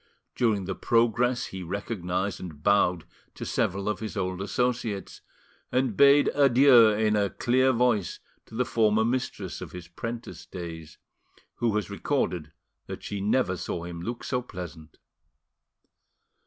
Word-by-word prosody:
During 110 -6 +1
the 95 - -2
progress 120 +3 +2
he 95 - -7
recognised 95 0 -3
and 75 -5 -9
bowed 90 -4 +3 0.3
to - - -6
several 100 +2 -1
of 105 -2 -1
his 110 0 -6
old 95 -1 -2
associates, 115 -1 -2 0.5
and 125 -3 +1
bade 140 +3 +6
adieu 130 -4 +6
in 105 0 +1
a 100 -1 +2
clear 130 +5 +2
voice 120 -7 +1 0.3
to - - -12
the 125 +2 +1
former 110 -2 +2
mistress 125 +2 -3
of - - -8
his 90 -2 -8
'prentice 115 +7 -7
days, 80 -3 -8 0.6
who 115 -3 0
has 105 -1 -2
recorded 90 - -1 0.4
that - - -7
she 100 -1 -4
never 105 -1 +1
saw 85 -1 -4
him 85 -1 -7
look 120 +6 -5
so 125 - -1
pleasant. 90 -8 -9
105 Hz, 140 wpm, -27 LUFS, 90-120 Hz, 0.6 s, bade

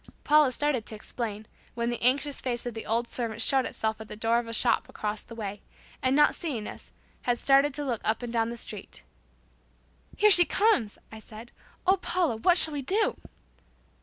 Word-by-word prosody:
Paula 300 -3 +5
started 260 -3 -1
to 220 - -6
explain, 215 -1 -6 0.3
when 235 0 -1
the 240 - -4
anxious 270 +3 +1
face 240 -2 -3
of 245 - -4
the 225 - -7
old 235 +2 0
servant 230 -3 -4
showed 265 +3 +3
itself 220 0 -3
at 220 - -9
the - - -7
door 225 +2 +1
of 240 - -6
the - - -6
shop 230 +1 +2
across 210 0 -4
the 230 - -12
way, 205 -2 -6 0.4
and 260 +1 +2
not 295 0 +5
seeing 260 -11 -4
us, - - -10 0.3
had 240 -1 -1
started 275 +1 +4
to 295 - -3
look 240 -5 -2
up 220 +3 0
and 240 -1 -5
down 225 -1 +1
the 235 - -6
street - - -7 1.1
"Here 425 0 +5
she 355 -2 +9
comes," 360 - +1
I 220 - -9
said. 220 +2 -12 0.3
"Oh, 380 +2 +4
Paula, 350 -9 -1
what 350 +10 +3
shall 320 -3 +3
we 285 - -3
do?" 390 +11 +1
240 Hz, 200 wpm, -27 LUFS, 225-290 Hz, 1.1 s, she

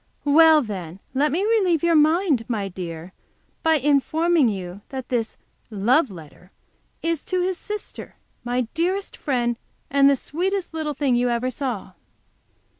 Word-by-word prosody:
"Well, 310 +1 +6
then, 185 -5 -6
let 285 +3 +2
me 350 +7 0
relieve 390 -8 +2
your 340 0 +3
mind, 310 - +3
my 210 -5 -2
dear, 175 -1 -7 0.5
by 320 0 +3
informing 295 +1 +2
you 190 -1 -6
that 260 -2 -6
this 230 -3 -2 0.3
'love 235 +8 +2
letter' 180 0 -13 0.5
is 330 -2 -1
to 370 -1 0
his 370 0 -2
sister, 420 0 -7 0.3
my 245 +1 0
dearest 370 +4 -1
friend, 240 -5 -1 0.3
and 280 0 +5
the 280 - +4
sweetest 360 +7 -3
little 310 -2 -3
thing 270 -4 +1
you 245 +1 +2
ever 240 +2 -1
saw." 245 -8 -4
280 Hz, 145 wpm, -23 LUFS, 230-330 Hz, 0.5 s, Well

